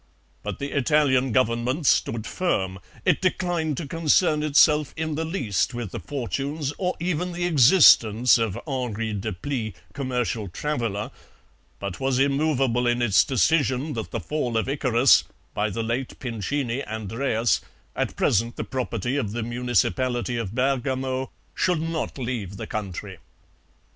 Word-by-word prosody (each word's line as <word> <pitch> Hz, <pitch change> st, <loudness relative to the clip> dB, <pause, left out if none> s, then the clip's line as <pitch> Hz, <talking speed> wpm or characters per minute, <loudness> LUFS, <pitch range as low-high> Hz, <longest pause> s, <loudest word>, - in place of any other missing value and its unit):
But -, -, -5 dB
the 140 Hz, 0 st, -5 dB
Italian 135 Hz, -2 st, +3 dB
Government 125 Hz, +5 st, +1 dB
stood 115 Hz, -3 st, +2 dB
firm; 95 Hz, -, -1 dB, 0.3 s
it -, -, +3 dB
declined 175 Hz, -5 st, 0 dB
to 160 Hz, -, -4 dB
concern 160 Hz, 0 st, +2 dB
itself 150 Hz, 0 st, +4 dB
in 160 Hz, -1 st, -2 dB
the 160 Hz, +2 st, -2 dB
least 120 Hz, -, -1 dB
with 120 Hz, -5 st, -5 dB
the -, -, -5 dB
fortunes 140 Hz, +2 st, -3 dB
or 180 Hz, -2 st, 0 dB
even 180 Hz, +1 st, -2 dB
the 175 Hz, 0 st, -2 dB
existence 125 Hz, -, +6 dB
of 110 Hz, -4 st, -1 dB
Henri 120 Hz, -6 st, -3 dB
Deplis, 110 Hz, +2 st, -4 dB, 0.2 s
commercial 125 Hz, -5 st, -2 dB
traveller, 115 Hz, -, -3 dB, 0.7 s
but 100 Hz, -2 st, -5 dB
was 135 Hz, -1 st, 0 dB
immovable 135 Hz, -3 st, +2 dB
in 120 Hz, 0 st, +2 dB
its 115 Hz, -5 st, +4 dB
decision 140 Hz, +1 st, +1 dB
that 110 Hz, -2 st, -4 dB
the -, -, -3 dB
Fall 125 Hz, -7 st, -2 dB
of 110 Hz, -, 0 dB
Icarus 130 Hz, -4 st, +4 dB, 0.3 s
(by 105 Hz, +1 st, 0 dB
the 115 Hz, +3 st, -3 dB
late 120 Hz, +3 st, -3 dB
Pincini, 125 Hz, +2 st, -2 dB
Andreas) 110 Hz, +2 st, 0 dB, 0.3 s
at -, -, -2 dB
present 115 Hz, +3 st, +1 dB
the -, -, -3 dB
property 125 Hz, 0 st, -2 dB
of 105 Hz, -7 st, -2 dB
the 120 Hz, 0 st, -2 dB
municipality 120 Hz, 0 st, 0 dB
of 115 Hz, -3 st, -4 dB
Bergamo, 130 Hz, 0 st, -1 dB, 0.2 s
should 180 Hz, -3 st, +1 dB
not 165 Hz, -1 st, -3 dB
leave 115 Hz, -7 st, -4 dB
the -, -, -5 dB
country. 100 Hz, -2 st, -5 dB
125 Hz, 140 wpm, -24 LUFS, 115-145 Hz, 0.7 s, existence